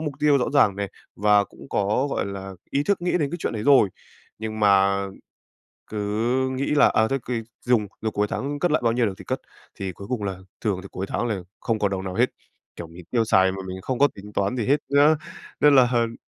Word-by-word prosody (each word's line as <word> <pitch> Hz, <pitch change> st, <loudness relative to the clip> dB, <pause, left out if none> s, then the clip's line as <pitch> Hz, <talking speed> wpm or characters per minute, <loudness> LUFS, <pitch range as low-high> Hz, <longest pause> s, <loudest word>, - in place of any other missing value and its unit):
mục 150 Hz, -2 st, -3 dB
tiêu 145 Hz, -1 st, +4 dB
rõ 125 Hz, -, 0 dB
ràng 105 Hz, -9 st, +4 dB
này 100 Hz, 0 st, -2 dB, 0.3 s
và 105 Hz, 0 st, +4 dB
cũng 70 Hz, -6 st, -15 dB
có, 105 Hz, +7 st, +1 dB
gọi -, -, -1 dB
là, 95 Hz, -1 st, -6 dB, 0.2 s
ý 140 Hz, -, +1 dB
thức 200 Hz, +4 st, 0 dB
nghĩ 175 Hz, 0 st, -1 dB
đến 145 Hz, -4 st, 0 dB
cái 175 Hz, -, -3 dB
chuyện -, -, -2 dB
đấy 110 Hz, -2 st, -4 dB
rồi, 135 Hz, -5 st, +6 dB, 0.5 s
nhưng 110 Hz, 0 st, -5 dB
mà 100 Hz, -1 st, +4 dB, 0.9 s
cứ 110 Hz, -, -8 dB, 0.5 s
nghĩ 130 Hz, +1 st, -2 dB
là, 145 Hz, -, +6 dB
à, 110 Hz, 0 st, +2 dB
thôi 135 Hz, -, 0 dB
kì 115 Hz, -2 st, -1 dB, 0.2 s
dùng 120 Hz, -4 st, +3 dB, 0.2 s
rồi 110 Hz, -1 st, -1 dB
cuối 105 Hz, 0 st, +1 dB
tháng 145 Hz, +2 st, -3 dB
cất 175 Hz, +3 st, +1 dB
lại 155 Hz, -, +2 dB
bao 115 Hz, -, +3 dB
nhiêu 120 Hz, -1 st, +2 dB
được 95 Hz, -, -2 dB
thì 95 Hz, -, -10 dB
cất, -, -, -3 dB, 0.3 s
thì 95 Hz, -1 st, -5 dB
cuối 100 Hz, +4 st, -10 dB
cùng 125 Hz, -4 st, -2 dB
là 95 Hz, -2 st, -3 dB, 0.2 s
thường 100 Hz, -5 st, 0 dB
thì 100 Hz, -, -10 dB
cuối 95 Hz, +2 st, -4 dB
tháng 120 Hz, -, -1 dB
là 105 Hz, -5 st, -2 dB, 0.2 s
không 115 Hz, -2 st, -1 dB
còn 100 Hz, -1 st, +1 dB
đồng 95 Hz, -1 st, -3 dB
nào 95 Hz, -1 st, -4 dB
hết. -, -, +4 dB, 0.5 s
Kiểu, 85 Hz, -, -6 dB
mình 85 Hz, +2 st, -13 dB
tiêu 115 Hz, -2 st, +2 dB
xài 95 Hz, -3 st, +4 dB
mà 95 Hz, -, -6 dB
mình 95 Hz, 0 st, -6 dB
không 130 Hz, +3 st, -2 dB
có 145 Hz, -, +5 dB
tính 105 Hz, +1 st, -11 dB
toán 100 Hz, +5 st, 0 dB
gì 115 Hz, -, -1 dB
hết 140 Hz, -, +4 dB
nhá 145 Hz, +2 st, +5 dB, 0.4 s
nên 145 Hz, -1 st, +6 dB
là, 125 Hz, -2 st, +6 dB
ờm, 115 Hz, -1 st, +1 dB
110 Hz, 245 wpm, -24 LUFS, 100-135 Hz, 0.9 s, rồi